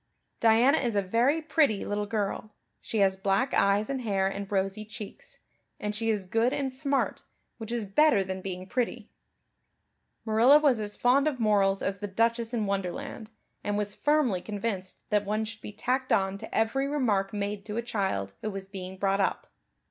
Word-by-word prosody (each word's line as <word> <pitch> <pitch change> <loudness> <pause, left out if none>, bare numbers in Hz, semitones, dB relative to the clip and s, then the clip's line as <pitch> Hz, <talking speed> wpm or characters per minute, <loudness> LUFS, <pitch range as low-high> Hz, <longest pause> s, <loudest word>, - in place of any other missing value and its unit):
"Diana 235 +6 +5
is 240 -5 -1
a 200 - +3
very 245 +11 +2
pretty 295 -9 +2
little 205 0 -2
girl. 210 0 -3 0.2
She 225 - -4
has 190 -1 +4
black 195 +7 0
eyes 200 +2 +3
and 270 -2 -2
hair 200 -5 0
and 195 +1 -3
rosy 195 +1 -1
cheeks. 215 -1 -10 0.4
And 210 0 -3
she 225 +1 -1
is 210 -3 0
good 225 +6 +1
and 270 -2 -2
smart, 275 +1 0 0.4
which 225 0 -6
is 235 -3 -1
better 205 0 +4
than 190 0 -5
being 185 -1 -5
pretty." 240 0 -3 1.1
Marilla 230 +6 +6
was 285 -6 +3
as 210 -1 -2
fond 270 +4 +3
of 280 -5 -1
morals 200 -3 +2
as 195 0 -2
the 205 - -4
Duchess 230 +3 0
in 225 -4 -1
Wonderland, 200 +4 -4 0.3
and 205 0 -1
was 205 -1 -1
firmly 290 -11 +1
convinced 200 -3 -4
that 210 -1 +3
one 215 +2 -1
should 220 0 -9
be - - -7
tacked 255 +5 -1
on 195 0 +1
to 220 - -8
every 245 +5 +1
remark 220 -9 0
made 205 -1 -3
to 210 +1 -4
a 235 - -1
child 190 - -2
who 215 - -2
was 195 -1 -6
being 190 -1 -7
brought 195 +1 +1
up. 195 - 0
210 Hz, 185 wpm, -28 LUFS, 195-240 Hz, 1.1 s, Marilla